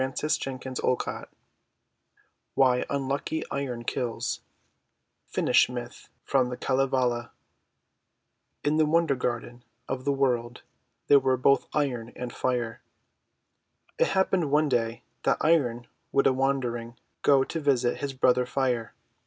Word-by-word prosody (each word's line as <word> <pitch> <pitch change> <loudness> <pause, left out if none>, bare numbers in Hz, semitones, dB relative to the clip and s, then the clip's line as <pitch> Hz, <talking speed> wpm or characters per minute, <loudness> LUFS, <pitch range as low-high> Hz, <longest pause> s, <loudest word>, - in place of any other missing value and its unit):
290 135 0 -1
THE - - -4
WONDER 125 - +3
GARDEN - - -6 1.3
WHY 125 -2 +3
UNLUCKY 140 +3 -2
IRON 130 -4 -3
KILLS 120 0 -2 0.9
Finnish - - +3
Myth 120 -1 -7
from 130 -2 +2
the 125 - -5
Kalevala 130 -3 0 1.3
IN 150 +1 +2
the 155 -1 +4
wonder 165 -1 +3
garden 120 -1 -3 0.2
of 130 -1 -3
the 140 - +1
World 125 -3 0 0.4
there 145 - +6
were 130 -1 +1
both 140 +2 +3
Iron 125 -6 -1
and 125 -1 -6
Fire. 120 -3 -2 1.2
It - - +4
happened 190 -4 +1
one 150 +1 +3
day 115 -2 -1 0.2
that - - +2
Iron 125 -7 +2 0.3
would 140 - +3
a 130 - +5
wander 135 -2 0
ing 115 0 -7 0.3
go 135 -2 +5
to 165 - -4
visit 130 -5 +1
his 140 -1 -3
brother 125 -1 +3
Fire. 125 -3 -1
130 Hz, 130 wpm, -27 LUFS, 120-140 Hz, 1.3 s, there